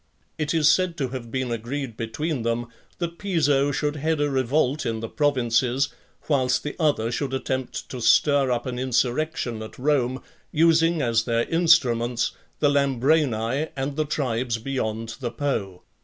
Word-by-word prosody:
It 150 -1 -1
is 160 -3 +3
said 175 +1 +3
to 135 -4 -1
have 125 -2 -6
been 130 0 -2
agreed 120 +2 -4
between 130 +6 -3
them, 115 +1 -1 0.3
that 170 -1 -4
Piso 145 -8 +2
should 150 +2 -1
head 160 +1 0
a 145 -1 +1
revolt 135 +2 +1
in 115 -1 -2
the 115 - -4
provinces, 130 -1 +1 0.4
whilst 130 -4 +2
the 150 - -4
other 145 -8 +1
should 135 +2 -2
attempt 130 -1 -3
to 125 - -6
stir 140 +4 +4
up 120 -1 -1
an 125 -1 -4
insurrection 125 -1 -1
at 110 - -9
Rome, 130 -2 0 0.3
using 165 0 +3
as 115 -2 +1
their 115 -1 0
instruments 125 -9 +3 0.3
the 145 - +5
Lambrani, 140 -1 +1
and 135 +1 -3
the 155 0 0
tribes 125 -5 -1
beyond 115 -2 -3
the 125 -3 -2
Po. 115 -8 -3
135 Hz, 155 wpm, -24 LUFS, 120-150 Hz, 0.4 s, the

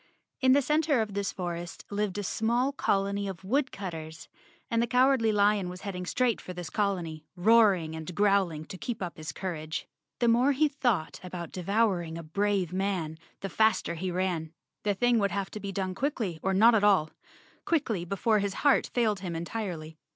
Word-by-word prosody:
In 260 -1 +5
the 285 +1 +4
center 300 -1 +2
of 215 -2 -1
this 200 0 -1
forest 175 -2 -5
lived 205 -1 -1
a 205 - -2
small 235 +7 +1
colony 200 -6 0
of 190 -1 -6
woodcutters, 190 - -3 0.4
and 230 -2 +1
the 235 - +1
Cowardly 250 -1 +4
Lion 205 -2 +2
was 180 0 -8
heading 180 -3 -5
straight 250 0 +1
for 180 - -7
this 175 -2 -7
colony, 175 -7 -1
roaring 190 -5 +4
and 160 0 -6
110 - - -6
Chapter - - -2
Nine - - +5
growling 170 -6 0
to 185 - -8
keep 235 -5 -4
up 175 - -5
his 155 -2 -5
courage. 155 -2 -4 0.3
The 240 - +1
more 245 +5 +4
he 305 +3 +3
thought 245 - -1
about 180 -2 -6
devouring 185 -3 0
a 165 - -6
brave 195 +1 0
man, 185 -5 -2 0.2
the 195 - -3
faster 220 -1 +2
he 180 +3 -3
ran. 175 -3 -1 0.3
The 205 -1 0
thing 245 +2 +3
would 200 -1 +2
have 195 -1 -3
to 215 - -6
be 200 -1 -5
done 190 -1 -2
quickly 220 - -2
or 190 0 0
not 225 +5 +7
at 215 -2 +3
all— 190 -7 +4 0.5
quickly 245 - 0
before 200 +4 +1
his 200 -1 -2
heart 285 - +4
failed 220 -5 +2
him 180 -3 -4
entirely. 165 -3 -5
195 Hz, 195 wpm, -29 LUFS, 175-225 Hz, 0.5 s, not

